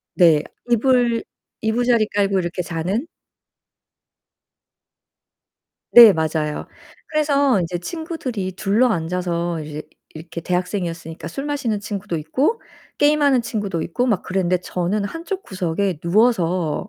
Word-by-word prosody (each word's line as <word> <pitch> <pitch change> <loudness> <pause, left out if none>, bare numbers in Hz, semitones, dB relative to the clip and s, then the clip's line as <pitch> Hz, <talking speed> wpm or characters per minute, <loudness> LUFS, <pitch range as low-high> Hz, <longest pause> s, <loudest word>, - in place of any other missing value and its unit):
네. 165 -5 +5 0.3
이불 240 -1 +2 0.4
이부자리 230 0 +2
깔고 200 -1 +2
이렇게 175 0 -2
자는? 180 - -2 2.8
네, 235 -3 +10
맞아요. 155 -2 -2 0.4
그래서 285 -6 +2
이제 175 +1 -3
친구들이 255 - -5
둘러앉아서 180 -5 0
이제 150 0 -7 0.3
이렇게 165 +1 -7
대학생이었으니까 175 -2 -3
술 275 - -5
마시는 265 -8 -1
친구도 205 -3 -4
있고 260 - 0 0.4
게임하는 290 -3 +4
친구도 205 -7 -3
있고 210 +9 -1
막 210 -7 +1
그랬는데 185 -1 0
저는 180 +3 -2
한쪽 340 - -5
구석에 185 -2 -2
누워서 180 -5 +1
195 Hz, 275 characters per minute, -21 LUFS, 170-245 Hz, 2.8 s, 네